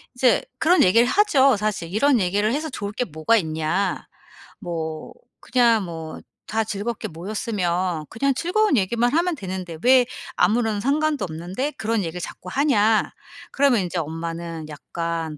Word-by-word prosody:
이제 250 0 +3 0.2
그런 355 +3 +4
얘기를 230 +6 +5
하죠 275 - +4
사실. 210 -5 -2
"이런 260 +4 +3
얘기를 205 +4 +1
해서 310 +3 -2
좋을 205 -7 -5
게 250 - -1
뭐가 160 +6 +1
있냐. 160 +2 -1 0.5
뭐 160 -4 -5 0.3
그냥 235 -4 +3
뭐 160 -2 -7 0.3
다 225 +1 0
즐겁게 215 +2 -4
모였으면 180 -2 -2
그냥 275 +5 0
즐거운 375 +2 +2
얘기만 235 +5 +1
하면 345 +3 +2
되는데 185 - -6
왜 255 0 +6 0.3
아무런 215 +2 +2
상관도 295 +1 +1
없는데 180 - -4
그런 220 0 0
얘기를 175 +1 -5
자꾸 180 - -8
하냐." 225 -6 +2 0.4
그러면 270 -6 +3
인제 180 0 -4
엄마는 165 0 -5
약간 165 +1 -4
205 Hz, 310 characters per minute, -23 LUFS, 170-250 Hz, 0.5 s, 왜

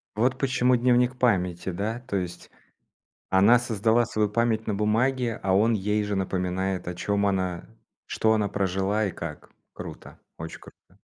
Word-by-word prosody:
Вот 125 +4 +1
почему 130 -2 +2
"Дневник 125 +1 +2
Памяти", 90 -8 +1
да, 105 +6 -3
то 100 - -1
есть 90 -1 -6 0.8
она 100 +6 +5
создала 115 0 +2
свою 105 -1 0
память 110 +1 0
на 105 - -1
бумаге, 115 +3 0
а 95 - +1
он 110 +4 +3
ей 105 +1 0
же 105 -1 -2
напоминает, 95 -1 -2
о 90 - -4
чем 100 +3 0
она 95 -3 -1 0.4
что 110 - +1
она 105 -2 +1
прожила 95 +2 0
и 95 - -3
как. 85 -3 -8 0.2
Круто, - - -10 0.2
очень 80 +1 -7
круто. - - -19
105 Hz, 155 wpm, -26 LUFS, 95-115 Hz, 0.8 s, она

